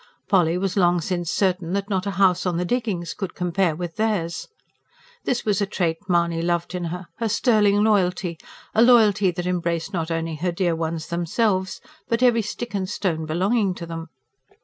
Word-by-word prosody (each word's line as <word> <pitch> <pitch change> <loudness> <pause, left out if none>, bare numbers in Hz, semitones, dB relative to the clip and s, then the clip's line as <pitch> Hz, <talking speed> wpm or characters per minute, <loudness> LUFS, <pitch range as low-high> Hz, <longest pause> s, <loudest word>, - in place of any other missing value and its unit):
Polly 175 -3 +3
was 190 0 -1
long 175 -3 +3
since 175 0 -2
certain 185 -3 0
that 200 0 -1
not 195 -1 -1
a 200 - -3
house 185 -2 +3
on 175 -2 0
the 180 - -1
diggings 210 -6 -2
could 195 -3 -5
compare 180 -1 0
with 175 +1 -6
theirs. 205 -7 -1 0.8
This 245 -1 -1
was 210 -1 +1
a 200 - +1
trait 170 -4 -1
Mahony 170 -1 +2
loved 170 +1 -1
in 180 -1 -3
her 180 +2 -5
her 230 -1 -1
sterling 210 -2 +3
loyalty; 180 -5 +1 0.3
a 220 - +4
loyalty 215 -5 +5
that 175 0 -4
embraced 170 0 -1
not 165 -2 -2
only 165 -1 -2
her 175 +3 -1
dear 175 -1 0
ones 160 -1 -3
themselves, 185 +3 0 0.3
but 230 +1 +1
every 240 -2 +5
stick 230 +2 -6
and 190 -2 -2
stone 165 -6 -2
belonging 190 +4 +1
to 170 - -7
them. 165 0 -6
180 Hz, 185 wpm, -23 LUFS, 170-205 Hz, 0.8 s, loyalty